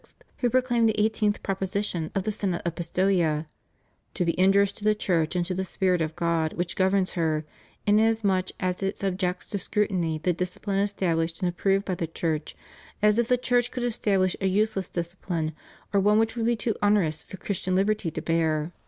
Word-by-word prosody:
who 245 - +1
proclaimed 240 -2 +3
the 215 - 0
18th 210 -1 +1
proposition 190 -3 -2
of 195 - 0
the 215 - -1
Synod 195 -5 -2
of 170 - -1
Pistoia"to 170 -1 -2
be 170 +1 -1
injurious 195 +1 +5
to 205 - -14
the 215 0 +3
Church 175 -5 0
and 175 -1 +1
to 185 - -2
the 190 +1 -1
Spirit 185 -1 0
of 160 0 -2
God 165 -2 0
which 175 0 -3
governs 190 0 +2
her, 160 -3 0 0.4
inasmuch 210 -3 +2
as 185 0 -2
it 195 0 -1
sub 195 -2 -1
jects 180 -1 -2
to 200 - -3
scrutiny 180 -6 0
the 180 +3 0
discipline 180 +3 -2
established 170 -5 0
and 180 - +2
approved 195 +3 +1
by 185 - -1
the 170 -2 -2
Church, 160 -1 -3 0.5
as 210 +1 +5
if 235 - +2
the 250 0 +3
Church 245 -1 +1
could 250 0 -4
establish 195 -6 +1
a 195 - +2
useless 200 -1 0
discipline 170 -2 -3 0.4
or 200 - +4
one 210 +2 +4
which 225 +1 +1
would 230 -1 0
be 240 - +3
too 225 0 -1
onerous 205 -7 +2
for 190 - -10
Christian 185 -1 -2
liberty 200 -1 +1
to - - -5
bear." 160 -1 0
190 Hz, 190 wpm, -26 LUFS, 170-210 Hz, 0.5 s, injurious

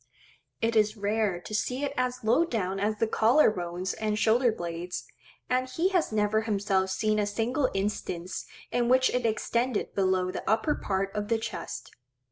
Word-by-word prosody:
It 230 0 +1
is 215 0 +3
rare 205 -2 0
to 215 - -9
see 250 +6 -1
it 280 -1 -1
as 250 -1 -1
low 235 +9 +4
down 195 - -2
as 210 +2 0
the 225 - +2
collar 225 +4 +4
bones 180 -1 -3
and 215 -1 -1
shoulder 230 +3 +3
blades; 175 -2 -5 0.4
and 255 +1 0
he 335 +8 +1
has 360 - +1
never 215 0 +2
himself 200 -3 0
seen 215 +3 +1
a 205 - +1
single 240 +6 0
instance 190 -3 -3 0.2
in 240 -1 +1
which 260 +1 +4
it 250 -2 +1
extended 235 +2 -1
below 185 -1 +1
the - - -5
upper 220 +8 +2
part 195 -4 -2
of 205 0 -2
the 230 +1 +2
chest. 225 0 -6
215 Hz, 175 wpm, -28 LUFS, 195-240 Hz, 0.4 s, low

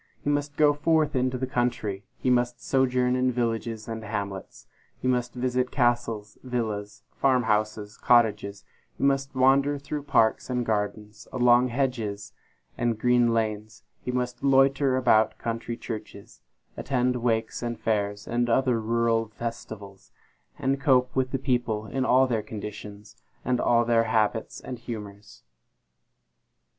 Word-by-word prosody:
He 145 - +1
must 145 0 -2
go 150 -1 +5
forth 150 0 +1
into 130 0 0
the 130 - -2
country; 120 -6 -2
he 125 - 0
must 120 0 +1
sojourn 125 -1 +1
in 130 0 +2
villages 115 -2 -2
and 115 -1 -5
hamlets; 100 -2 -5 0.3
he - - -3
must 125 -1 0
visit 125 0 0
castles, 120 -4 -1
villas, 110 -3 -4
farm 130 -2 +3
houses, 105 -1 -1
cottages; 105 -4 +2 0.3
he - - -5
must 135 0 +1
wander 135 +2 +3
through 145 +1 -5
parks 135 -6 +2
and 125 -1 -1
gardens; 105 0 -3
along 125 0 +4
hedges 120 -6 -2 0.5
and 120 -2 0
green 120 0 +3
lanes; 110 -1 -2 0.2
he - - -5
must 125 -1 -3
loiter 135 0 +3
about 110 -4 +3
country 115 0 -4
churches; 110 -2 -8 0.3
attend 125 -1 0
wakes 115 -2 -1
and 120 -2 -4
fairs, 105 -2 -1
and 120 +1 0
other 125 -1 +2
rural 115 0 +1
festivals; 110 -3 -8 0.5
and 135 +1 -1
cope 125 -2 +3
with 130 -1 +1
the 135 - -1
people 120 -5 -1
in 130 +3 -2
all 130 +1 +5
their 115 -4 -1
conditions, 105 0 -9 0.3
and 125 -1 +1
all 120 0 +3
their 115 -1 +3
habits 110 0 0
and 125 -2 -7
humors. 105 -3 -9
120 Hz, 140 wpm, -26 LUFS, 110-130 Hz, 0.5 s, go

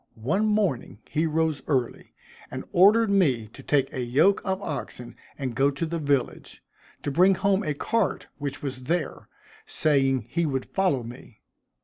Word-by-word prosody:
One 175 - 0
morning 200 - 0
he 160 +2 0
rose 160 -1 0
early, 130 -5 -2 0.3
and - - -6
ordered 210 +4 +5
me 135 - +2
to - - -13
take 140 -2 +1
a 130 - -3
yoke 140 +12 +3
of 190 -1 -1
oxen 140 -6 -6 0.2
and 130 -4 -3
go 135 +3 +3
to 140 +3 -3
the 165 +1 -3
village, 140 -4 -2 0.4
to 145 - -2
bring 185 +6 +5
home 195 +1 +1
a 150 -5 -2
cart 225 +7 -1
which 145 -1 -5
was 130 -2 -5
there, 165 +2 -2 0.4
saying 135 -5 +1
he 170 +6 0
would 135 -2 -2
follow 180 -10 0
me. 120 -1 -12
145 Hz, 160 wpm, -26 LUFS, 130-185 Hz, 0.4 s, ordered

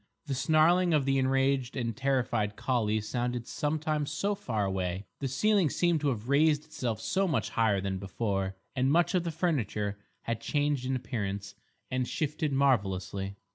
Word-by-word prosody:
The 140 - -2
snarling 160 +5 +4
of 145 -3 +2
the 135 0 +2
enraged 135 0 +1
and 115 -3 -2
terrified 120 -5 0
collie 110 -4 0
sounded 120 +2 -2
sometimes 150 0 -1
so 205 +1 0
far 120 - -2
away; 95 0 -2
the 135 - -1
ceiling 195 - +3
seemed 170 -1 +1
to 150 - +1
have 115 -3 -3
raised 150 +2 +3
itself 125 -8 -3
so 195 +11 0
much 160 - 0
higher 110 -4 +2
than 95 0 -2
before, 95 0 -2 0.2
and 130 +1 +2
much 170 +4 +3
of 180 -2 +1
the - - 0
furniture 110 - -1 0.2
had 115 -1 -3
changed 145 -2 0
in 130 - 0
appearance 100 -5 -4 0.4
and 130 -1 0
shifted 150 0 -1
marvellously. 100 -7 0
130 Hz, 165 wpm, -30 LUFS, 105-150 Hz, 0.4 s, snarling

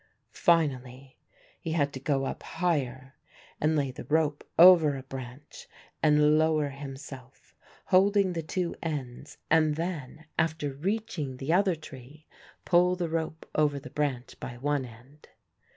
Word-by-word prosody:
Finally 135 -6 0 0.4
he 160 - -4
had 145 -3 +1
to 130 - -6
go 135 0 0
up - - -5
higher 135 -6 -2 0.5
and 155 +1 +2
lay 140 -3 0
the 125 - -9
rope 150 +1 +1
over 165 -5 +7
a 130 - -8
branch 130 +2 -10 0.3
and 150 0 +4
lower 155 -2 +2
himself, 135 -1 -10 0.3
holding 195 0 +3
the 165 - -2
two 170 +2 -2
ends 140 -7 -5
and 155 -2 +4
then, 160 -3 -5
after 160 -3 0
reaching 180 - -3
the 140 +5 -1
other 190 -1 +3
tree, 150 0 -13 0.4
pull 180 0 +4
the 175 -2 -3
rope 160 -1 -3
over 145 -2 +1
the 140 - -11
branch 135 -4 -3
by 120 - -7
one 145 +1 -1
end. 125 +6 -16
150 Hz, 140 wpm, -28 LUFS, 135-165 Hz, 0.5 s, over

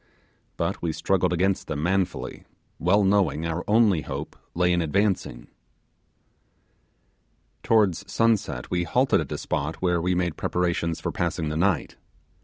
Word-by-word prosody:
But - - -2
we 85 -2 -1
struggled 90 +2 +1
against 95 +2 0
them 75 -1 -3
manfully, 95 0 -1 0.4
well 100 +5 +3
knowing 95 -5 +2
our 85 +1 -2
only 105 -6 +4
hope - - -6 0.2
lay 90 +1 +3
in 85 - +2
advancing. 90 - 0 2.2
Towards 100 -3 +2
sunset 115 -2 0
we 90 -1 +1
halted 85 - +2
at - - -6
a - - -2
spot 75 +3 -2
where 90 -2 0
we 90 +1 +1
made 90 -3 -1
preparations 85 -2 -1
for - - -3
passing 85 -2 -2
the 75 - -3
night. 85 -2 0
90 Hz, 140 wpm, -25 LUFS, 80-95 Hz, 2.2 s, only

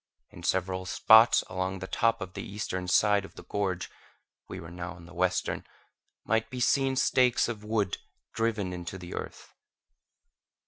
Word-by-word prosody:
In - - -12
several 95 0 -1
spots 110 +4 +6
along 95 +1 -2
the 95 - -6
top 115 +2 +1
of 95 -1 -6
the - - -5
eastern 95 -3 -4
side 105 +1 +4
of 95 - -12
the - - -10
gorge 95 -3 -2 0.6
(we - - -6
were 85 - -9
now 90 +1 -6
on 85 -1 -13
the 90 - -13
western) - - 0 0.6
might 110 0 +1
be 125 - -6
seen 135 +1 +2
stakes 125 -2 +3
of 110 -3 -5
wood 105 -3 -1 0.3
driven 105 -5 -1
into 90 +1 -6
the 90 -1 -9
earth. - - -7
100 Hz, 165 wpm, -29 LUFS, 90-115 Hz, 0.6 s, spots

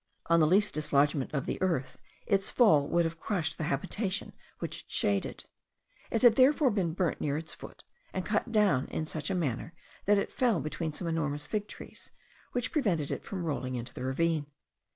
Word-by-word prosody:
On 170 - +6
the 155 - +5
least 200 +5 +3
dislodgment 145 -2 +1
of 140 -3 -2
the - - -3
earth, 165 -9 -1 0.3
its 195 -2 +2
fall 155 - +5
would 170 0 +2
have 165 0 -4
crushed 175 -6 -2
the 160 - -1
habitation 185 - -2 0.2
which - - -4
it - - -14
shaded: 100 -1 0 0.6
it 225 - -1
had 235 -2 +7
therefore 270 +1 +5
been 185 -6 0
burnt 180 -3 0
near 145 -1 0
its 160 +1 -4
foot, - - -11 0.3
and 185 - -3
cut 210 +2 0
down 205 - +3
in 155 - -3
such 155 -1 -4
a 190 - 0
manner, 165 0 -2 0.3
that 205 0 +5
it 200 - -1
fell 235 -8 +2
between 155 +1 -3
some 175 - -5
enormous 150 -3 -1
fig 210 +6 -2
trees, - - -10 0.4
which 245 -1 -2
prevented 185 - 0
it - - -3
from 185 -3 -5
rolling 130 -5 -2
into 120 0 -5
the - - -6
ravine. 150 +3 0
165 Hz, 195 wpm, -30 LUFS, 145-200 Hz, 0.6 s, had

